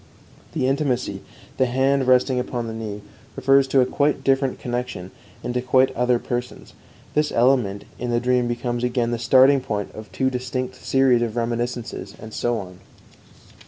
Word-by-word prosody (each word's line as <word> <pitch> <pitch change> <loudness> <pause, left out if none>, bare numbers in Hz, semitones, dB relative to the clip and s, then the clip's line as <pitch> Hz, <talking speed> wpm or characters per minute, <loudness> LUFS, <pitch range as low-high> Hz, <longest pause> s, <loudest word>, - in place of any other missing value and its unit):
The - - 0
intimacy, 130 -7 -1 0.4
the 130 - +3
hand 135 +1 +1
resting 125 0 +3
upon 125 -1 -3
the 115 - -5
knee, 105 -2 -6 0.3
refers 135 0 +4
to 135 0 +4
a - - +4
quite 145 +3 0
different 135 -1 +1
connection 120 -7 -4 0.3
and 120 - -3
to 125 - 0
quite 130 +1 +3
other 125 0 +2
persons. 120 +1 -5 0.4
This 150 0 +1
element 120 -5 +2
in 125 - -3
the 120 0 +2
dream 125 0 +1
becomes 120 0 -2
again 120 -1 0
the 120 - -2
starting 130 +3 +5
point 105 -5 -3
of 110 0 -10
two 130 -1 0
distinct 130 0 -3
series 135 -3 +3
of 115 -2 -2
reminiscences, 120 -3 -3
and 110 0 -10
so 120 -1 0
on. 90 -3 -8
125 Hz, 165 wpm, -22 LUFS, 120-130 Hz, 0.4 s, starting